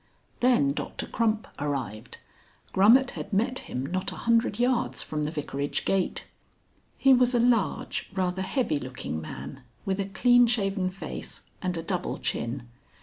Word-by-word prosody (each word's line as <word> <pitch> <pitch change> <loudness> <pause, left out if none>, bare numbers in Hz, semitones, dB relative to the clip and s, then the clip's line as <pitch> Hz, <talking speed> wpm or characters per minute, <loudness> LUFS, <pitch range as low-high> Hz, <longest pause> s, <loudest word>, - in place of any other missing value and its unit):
XIII. - - -37
Then 240 - +4
Doctor - - -4
Crump 220 -1 0
arrived. 125 -6 -4 0.5
Grummet 230 +7 +6
had 205 - -7
met 235 +6 +1
him 130 +1 -4
not 185 +5 -2
a - - -7
hundred 230 -3 +3
yards 245 0 +1
from 150 -1 -2
the - - -1
vicarage 145 -2 -3
gate. 195 -2 0 0.7
He 270 -1 +6
was 250 0 +4
a - - +4
large, 235 -4 +1
rather 190 -1 -1
heavy 190 - 0
looking 125 - -5
man, 75 - -8 0.2
with 195 0 -1
a 195 - 0
clean 245 +5 +5
shaven 195 -5 0
face 185 -4 -7 0.2
and 180 -2 -1
a 165 - -3
double 180 +1 -2
chin. 120 +1 -3
190 Hz, 155 wpm, -27 LUFS, 145-235 Hz, 0.7 s, Grummet